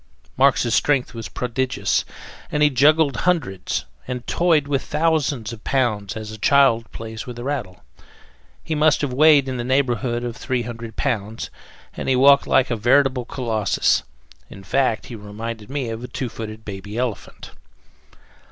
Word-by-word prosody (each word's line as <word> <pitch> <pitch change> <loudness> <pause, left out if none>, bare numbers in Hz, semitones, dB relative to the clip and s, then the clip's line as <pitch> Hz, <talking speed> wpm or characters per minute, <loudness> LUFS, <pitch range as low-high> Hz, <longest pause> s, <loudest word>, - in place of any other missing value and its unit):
Marx's 130 -3 +3
strength 140 -2 +2
was 115 -2 -7
prodigious, 125 +1 -1 0.5
and 150 0 +2
he 150 - +5
juggled 145 +1 +4
hundreds, 135 - -1 0.2
and 125 -1 -5
toyed 165 -5 +2
with 140 -2 0
thousands, 150 -7 0
of 110 - -11
pounds 110 -7 0
as 110 0 -6
a 110 - -9
child 115 -3 +3
plays 110 +1 -7
with 120 -1 -7
a 120 - -6
rattle. 125 -10 -4 0.8
He 160 - -3
must 155 0 +3
have 140 -4 -2
weighed 145 0 +5
in 130 -1 -3
the 120 - -3
neighborhood 125 -2 0
of 120 -1 -4
three 125 -1 -2
hundred 115 -1 -7
pounds, 110 -5 -3 0.4
and - - -4
he 130 - +3
walked 140 +2 +6
like 130 -1 +3
a - - +1
veritable 130 +2 +2
colossus. 110 -6 +1 0.5
In 95 - -11
fact, 115 +2 0
he 120 - -8
reminded 105 +1 -7
me 135 -4 -3
of 115 +1 -5
a - - -5
two 125 -1 -4
footed 110 -1 -8
baby 100 +2 -7
elephant. 120 -5 -4
125 Hz, 160 wpm, -22 LUFS, 110-140 Hz, 0.8 s, walked